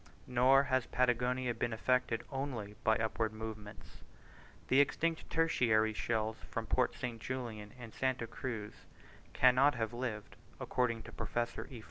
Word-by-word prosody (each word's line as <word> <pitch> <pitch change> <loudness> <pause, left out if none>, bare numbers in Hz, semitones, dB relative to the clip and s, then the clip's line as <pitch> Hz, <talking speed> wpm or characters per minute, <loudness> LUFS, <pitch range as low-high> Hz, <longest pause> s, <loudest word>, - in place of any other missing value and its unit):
Nor 130 +2 +5
has 130 -3 0
Patagonia 125 0 +1
been 115 +1 -2
affected 125 0 +1
only 130 -7 -4
by 110 - +4
upward 110 0 0
movements: 110 -1 -8 0.7
the 130 - +4
extinct 160 +3 +1
tertiary 115 -9 +3
shells 110 0 -1
from 115 - -3
Port 125 +4 +1
St. 120 -4 -5
Julian 115 -5 -5
and 115 -3 -9
Santa 130 -2 0
Cruz 115 -2 -6 0.5
cannot 130 +3 +5
have 115 -1 -2
lived, 120 -4 -4 0.2
according 115 -3 0
to - - -10
Professor 120 -1 -3
E. 125 -4 -8
120 Hz, 135 wpm, -34 LUFS, 110-130 Hz, 0.7 s, Nor